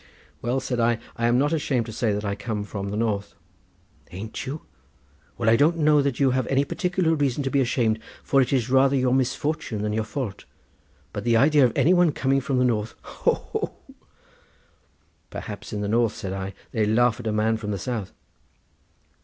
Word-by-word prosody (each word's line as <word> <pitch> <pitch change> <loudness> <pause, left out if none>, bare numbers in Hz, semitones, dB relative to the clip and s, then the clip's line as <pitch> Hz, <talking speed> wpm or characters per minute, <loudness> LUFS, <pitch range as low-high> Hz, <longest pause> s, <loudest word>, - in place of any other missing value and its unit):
"Well," 125 +3 0
said 125 -2 -3
I; 115 0 +3 0.2
"I 115 0 0
am 120 +1 +3
not 145 +4 +2
ashamed 135 -6 0
to 115 - -7
say 115 -1 0
that 105 +1 -2
I 100 - -1
come 105 0 -4
from 100 -1 -5
the 105 - -3
north." 105 -3 -1 0.7
"Ain't 105 +8 -6
you? 145 +4 -5 0.7
Well, - - -2
I 110 - +6
don't 155 +7 +3
know 150 -2 +4
that 140 -3 -1
you 135 -2 +4
have 130 -1 0
any 135 +1 +2
particular 180 +1 0
reason 145 -2 0
to 135 - -2
be 140 - +3
ashamed, 115 -3 +1 0.2
for 135 - +3
it 130 - 0
is 125 -4 +1
rather 135 +1 +4
your 130 -1 +2
misfortune 135 -3 -1
than 105 0 -1
your 110 0 0
fault; 110 -3 -5 0.7
but 105 - -4
the 115 -1 +3
idea 145 +3 +5
of 120 - 0
any 175 - +4
one 175 -4 +4
coming 135 +1 +1
from 135 0 -1
the 125 - +3
north—ho, 110 -3 -1
ho!" - - -2 1.5
"Perhaps - - -7
in 105 - -3
the 105 - -2
north," 115 +1 +2
said 95 -1 -5
I, 95 0 -5 0.2
"they 110 - 0
laugh 120 +1 +3
at 115 - -5
a - - +1
man 110 +1 +1
from 105 -1 -6
the 100 - -1
south." 110 -2 -4
120 Hz, 200 wpm, -24 LUFS, 110-135 Hz, 1.5 s, I